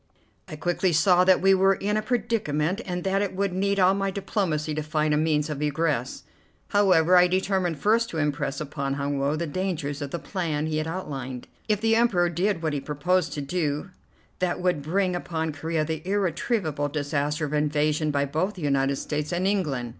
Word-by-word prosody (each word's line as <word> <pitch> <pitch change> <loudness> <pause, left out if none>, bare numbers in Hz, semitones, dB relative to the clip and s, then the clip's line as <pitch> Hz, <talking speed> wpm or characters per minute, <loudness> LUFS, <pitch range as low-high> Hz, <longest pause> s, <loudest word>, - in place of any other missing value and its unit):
I - - -7
quickly 175 +3 0
saw 180 +4 +5
that 185 0 +4
we 195 0 +6
were 195 +1 +4
in 205 +2 -1
a 215 - +1
predicament, 210 - -1
and 180 -1 -3
that 195 +1 +1
it 200 -2 -2
would 195 -1 -1
need 200 +1 0
all 185 0 +5
my 195 0 -1
diplomacy 180 -6 -2
to 155 - -2
find 150 0 0
a - - +3
means 150 -1 +1
of 150 -2 -4
egress. 150 -4 -1 0.5
However, 185 -4 +4
I 180 0 +7
determined 185 -2 0
first 225 +7 +2
to 165 - -5
impress 145 -2 -1
upon 140 -2 -3
Hun 140 0 -2
Woe 140 +2 +1
the 170 +2 -2
dangers 155 -4 -3
of 145 - -3
the 170 - -3
plan 165 -5 -2
he 155 -1 -1
had 155 +1 -1
outlined. 135 -8 -5 0.2
If 210 -2 +1
the 225 0 +3
Emperor 195 -7 +3
did 175 +1 -1
what 155 -2 0
he 145 - -2
proposed 155 +3 0
to 145 - -3
do, 150 +3 -2 0.5
that 180 -1 0
would 180 -4 0
bring 180 +4 0
upon 160 -3 -3
Corea 160 +1 -1
the 160 0 -3
irretrievable 185 -4 -1
disaster 150 +1 -1
of 145 - -5
invasion 150 +1 +1
by 140 -1 +1
both 160 +9 -1
the 180 - -8
United 140 -1 +1
States 150 +2 -3
and 180 +1 -1
England. 150 -12 0
160 Hz, 200 wpm, -25 LUFS, 150-190 Hz, 0.5 s, I